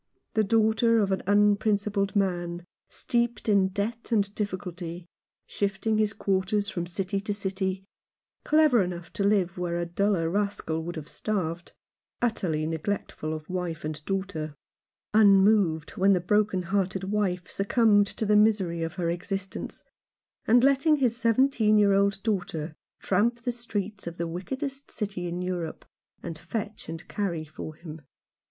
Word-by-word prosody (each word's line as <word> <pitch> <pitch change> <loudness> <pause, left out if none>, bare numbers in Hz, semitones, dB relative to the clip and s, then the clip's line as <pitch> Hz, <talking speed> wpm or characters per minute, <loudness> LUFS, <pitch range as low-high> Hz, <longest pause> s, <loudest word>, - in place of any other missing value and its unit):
The 220 - +3
daughter 225 +2 +3
of 200 -3 +2
an 190 - 0
unprincipled 205 0 +2
man 175 -3 -1
— - - -67
steeped 235 -1 -1
in 200 -3 +4
debt 215 +5 -4
and 205 -3 +1
difficulty; 180 -4 -5 0.4
shifting 215 +2 -1
his 215 -1 +2
quarters 200 +1 0
from 175 -3 -3
city 190 +2 -2
to 205 0 -3
city; 190 -1 -3 0.6
clever 305 -7 +4
enough 175 -2 -4
to 200 - -1
live 195 -3 +2
where 175 -1 -1
a 175 - -1
duller 175 0 +1
rascal 200 -4 -1
would 175 - -5
have 155 -2 -7
starved; 175 -4 -3 0.5
utterly 180 -10 0
neglectful 160 -1 -3
of 155 -1 -5
wife 180 -4 -3
and 155 -1 -5
daughter; 190 -6 -3 0.6
unmoved 195 -6 +5
when 195 +1 +3
the 185 - +3
broken 200 +1 +1
hearted 190 +1 -1
wife 190 -3 -1
succumbed 205 0 +3
to 220 - -2
the 210 0 +3
misery 205 -6 +3
of 165 +1 -3
her 175 -2 -1
existence, 195 +2 -5 0.6
and 240 +2 +5
letting 275 +3 +4
his 250 -5 +1
seventeen 230 -2 +3
year 205 -1 +5
old 200 0 +2
daughter 175 -7 -2 0.3
tramp 230 +5 +1
the 245 - 0
streets 210 -5 -4
of 170 0 -6
the 170 - -2
wickedest 265 - -5
city 195 -4 -4
in 175 +1 -3
Europe, 175 -3 -4 0.4
and 160 -1 -6
fetch 210 +5 -5
and 165 +1 -7
carry 175 -6 -2
for 155 0 -8
him. 160 -1 -10
195 Hz, 150 wpm, -27 LUFS, 175-215 Hz, 0.6 s, unmoved